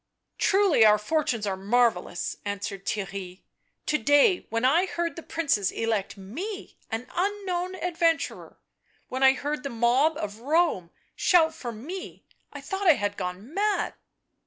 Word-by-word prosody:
" - - -55
Truly 385 - +4
our 210 -1 +7
fortunes 235 -1 -1
are 195 -2 -1
marvellous," 195 -4 0
answered 200 -1 -5
Theirry. 195 -2 -4 0.2
" - - -48
To 305 - +1
day 290 +7 +4
— - - -40
when 230 +2 0
I 335 +8 +4
heard 340 -2 -2
the 335 - -7
Princes 285 - 0
elect 220 -4 -2
me 330 - -7
— - - -32
an 225 +2 -3
unknown 370 -1 -1
adventurer! 335 -2 -1 0.3
— - - -39
when 260 +1 -4
I 265 0 +7
heard 295 +2 -3
the 280 - -4
mob 250 +6 +2
of 210 +1 -5
Rome 290 - +1 0.3
shout 325 -3 +4
for 245 -6 -6
me 305 - -8
— - - -45
I - - -8
thought 390 0 -3
I 315 - +8
had 205 -3 -2
gone 190 - -6
mad!" 415 +2 0
270 Hz, 170 wpm, -26 LUFS, 210-340 Hz, 0.3 s, I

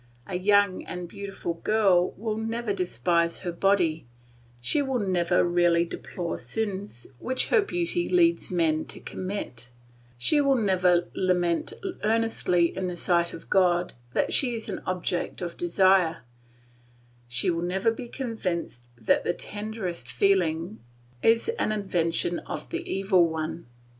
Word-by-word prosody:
A - - -8
young 200 +1 +3
and 180 -1 -6
beautiful 200 -2 -5
girl 185 -1 +2
will 220 0 -2
never 225 0 -2
despise 170 -1 0
her 180 - -3
body, 170 -5 +1 0.5
she 210 - +1
will 265 -2 -1
never 180 -4 +2
really 175 -1 +3
deplore 170 0 -5
sins 195 - -4
which 260 +1 0
her 465 - +5
beauty 350 -3 -1
leads 345 -1 +3
men 160 -4 +1
to - - -6
commit, 185 - -5 0.5
she 290 - +3
will 275 -1 +3
never 185 -6 +3
lament 175 -2 +1 0.3
earnestly 215 -6 +1
in 190 -1 -2
the 180 - -4
sight 170 -1 +1
of 165 - -10
God 180 -2 +3 0.2
that - - +1
she 245 -4 +4
is 225 -1 -6
an 195 - -4
object 180 -1 -2
of 175 -2 -4
desire, 175 -2 +3 1.0
she 120 +7 +1
will 165 0 -2
never 190 +5 +1
be 240 +2 -7
convinced 180 - -4
that 115 - +2
the - - 0
tenderest 205 - -5
feeling 170 - +1 0.4
is 225 0 +3
an - - +1
invention 175 -4 0
of - - -7
the - - -3
Evil 190 -3 +3
One. 160 -1 -4
185 Hz, 140 wpm, -26 LUFS, 170-215 Hz, 1.0 s, her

